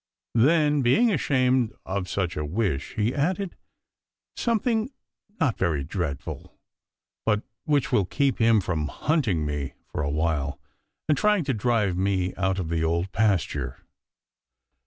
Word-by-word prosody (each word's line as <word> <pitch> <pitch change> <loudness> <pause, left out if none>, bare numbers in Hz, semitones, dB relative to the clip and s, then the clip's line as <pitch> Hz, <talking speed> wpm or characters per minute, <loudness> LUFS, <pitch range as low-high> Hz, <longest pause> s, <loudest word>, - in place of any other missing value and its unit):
Then, 150 +4 +4
being 215 - +4
ashamed 130 - +2
of 95 -1 -3
such 90 -3 -1
a 75 - -2
wish, 80 -3 -2
he 110 +2 +1
added, 180 +6 -1 0.8
"Something 230 0 +1 0.5
not 130 -8 +1
very 80 -6 +1
dreadful, 75 -2 -5 0.7
but 105 -1 +1 0.2
which 145 -4 +1
will 105 -6 +3
keep 140 +7 0
him 115 -2 +5
from 80 -5 -1
hunting 115 - 0
me 75 -2 -3
for - - -4
a 70 - -1
while 75 -2 -1 0.5
and 150 - +4
trying 205 +5 +3
to 135 -2 0
drive 110 -4 +1
me 95 -1 0
out 95 -1 0
of 90 -4 -3
the 80 -1 0
Old 85 +3 0
Pasture." 105 -5 0
105 Hz, 135 wpm, -26 LUFS, 85-140 Hz, 0.8 s, him